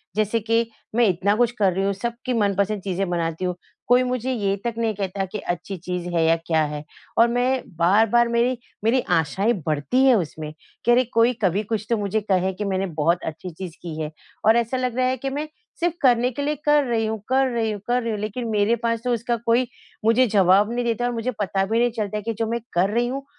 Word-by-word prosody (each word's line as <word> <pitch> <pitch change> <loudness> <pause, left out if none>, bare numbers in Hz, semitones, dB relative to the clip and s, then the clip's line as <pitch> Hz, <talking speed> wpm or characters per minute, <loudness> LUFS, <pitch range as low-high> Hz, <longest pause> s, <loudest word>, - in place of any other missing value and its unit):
जैसे 215 +2 +1
कि 230 +1 +1 0.3
मैं 240 0 +5
इतना 190 +3 +2
कुछ 240 +1 +2
कर 205 -6 +2
रही 195 - -1
हूँ, 200 - +1
सबकी 235 +5 -4
मनपसंद 200 -2 +1
चीज़ें 190 0 -2
बनाती 170 0 -2
हूँ 180 -1 -1 0.3
कोई 245 +1 +5
मुझे 255 0 -2
ये 200 -4 0
तक 235 - 0
नहीं 225 -1 0
कहता 195 0 -2
कि 190 +3 -6
अच्छी 175 +3 -4
चीज़ 180 0 -4
है 165 -1 +2
या 165 +1 +4
क्या 160 -2 +2
है। 150 0 -5 0.3
और 230 - +6
मैं 250 +2 +1 0.2
बार-बार 220 +7 +4
मेरी, 235 +2 +1 0.3
मेरी 240 +4 +3
आशाएँ 190 +9 +1
बढ़ती 155 - +1
हैं 260 -2 +6
उसमें 155 -5 -3 0.3
कि 240 - +4
अरे, 250 +2 +5
कोई 235 0 +2
कभी 195 +3 +2
कुछ 215 0 -3
तो 230 - +2
मुझे 205 +1 -1
कहे 190 -2 +1
कि 205 +3 -4
मैंने 195 -1 0
बहुत 165 +3 +1
अच्छी 160 +3 -5
चीज़ 170 0 -8
की 170 -3 -6
है। 155 0 -4 0.3
और 220 +2 +6
ऐसा 235 +2 0
लग 250 -2 -1
रहा 255 - +2
है 260 0 0
कि 270 +3 -3
मैं 290 +3 -3 0.3
सिर्फ़ 345 0 0
करने 250 -1 +4
के 285 - -5
लिए 295 +1 0
कर 295 0 +5
रही 230 -3 0
हूँ 220 0 -2
कर 265 +1 +3
रही 225 -2 0
हूँ 210 - -4
कर 245 +1 +2
रही 230 -1 -2
हूँ 210 - -3
लेकिन 215 +3 -4
मेरे 215 +1 +2
पास 230 -1 0
तो 245 -1 +1
उसका 235 +1 -1
कोई 240 +2 +3 0.4
मुझे 235 +3 +4
जवाब 200 +1 +4
नहीं 245 0 -1
देता 235 +1 0
और 245 - 0
मुझे 235 +2 -2
पता 195 -1 0
भी 225 +4 0
नहीं 240 0 +3
चलता 215 -2 -3
है 210 - -5
कि 230 +2 -2
जो 225 - 0
मैं 235 +1 -1
कर 180 +3 +2
रही 235 +3 +1
हूँ 270 +2 -4
220 Hz, 240 wpm, -23 LUFS, 190-240 Hz, 0.4 s, और